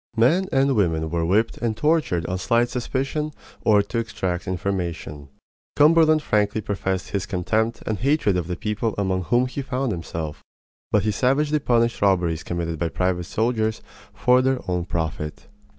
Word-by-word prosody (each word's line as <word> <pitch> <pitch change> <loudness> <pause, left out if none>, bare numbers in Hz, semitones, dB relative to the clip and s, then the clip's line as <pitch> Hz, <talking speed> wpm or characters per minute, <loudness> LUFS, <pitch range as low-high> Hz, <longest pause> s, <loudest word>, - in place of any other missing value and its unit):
Men 165 +12 +3
and 135 0 +3
women 80 -5 +1
were 85 -1 0
whipped 110 +6 +1
and 115 -3 -1
tortured 150 - +1
on 90 0 -2
slight 120 +4 +2
suspicion 135 +5 -2 0.3
or 105 -2 +4
to 115 +3 -3
extract 95 -5 -3
information. 85 -6 -3 0.5
Cumberland 155 0 +5
frankly 105 0 +1
professed 95 -2 -3
his 100 -2 -2
contempt 110 +4 -1
and 110 -3 -2
hatred 135 -7 +2
of 90 -2 -1
the 90 - -2
people 105 +3 -2
among 95 -3 0
whom 120 +7 +3
he 130 +2 -4
found 130 -1 -2
himself, 80 -4 -5 0.5
but 105 -3 +3
he 110 - +1
savagely 145 +7 +1
punished 120 -3 +1
robberies 90 -5 +2
committed 85 -2 -3
by 85 - 0
private 90 +3 -1
soldiers 110 +2 -1 0.3
for 125 +1 +3
their 130 0 +2
own 90 -1 -1
profit. 80 -3 -4
105 Hz, 160 wpm, -23 LUFS, 90-125 Hz, 0.5 s, Cumberland